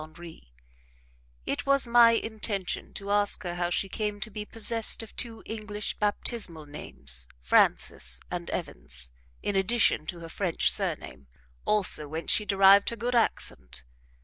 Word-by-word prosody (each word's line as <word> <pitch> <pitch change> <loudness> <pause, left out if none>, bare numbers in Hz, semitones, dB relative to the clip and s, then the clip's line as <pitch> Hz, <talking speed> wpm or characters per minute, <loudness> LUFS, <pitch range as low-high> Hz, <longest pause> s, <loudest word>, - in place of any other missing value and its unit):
Henri; 155 - -13 0.9
it - - -3
was 275 -1 +4
my 235 -1 +6
intention 215 -4 -3
to 200 0 -6
ask 205 0 +2
her 175 -1 -4
how 175 0 -2
she 195 - 0
came 210 +1 -4
to 215 - -6
be 210 +1 -6
possessed 225 +1 +2
of 225 - -14
two 230 -2 -3
English 210 -1 -5
baptismal 205 -6 -1
names, 65 - +1 0.2
Frances 60 0 +2
and 175 -1 -5
Evans, - - -4 0.3
in 205 - -2
addition 195 -5 +2
to 175 - -5
her 165 - -9
French 180 -1 0
surname, 65 +1 -3 0.4
also 190 -8 +2
whence 160 +3 -2
she 210 - +3
derived 195 0 +5
her 235 - -5
good 240 +2 -3
accent. 65 - 0
195 Hz, 150 wpm, -27 LUFS, 160-220 Hz, 0.9 s, my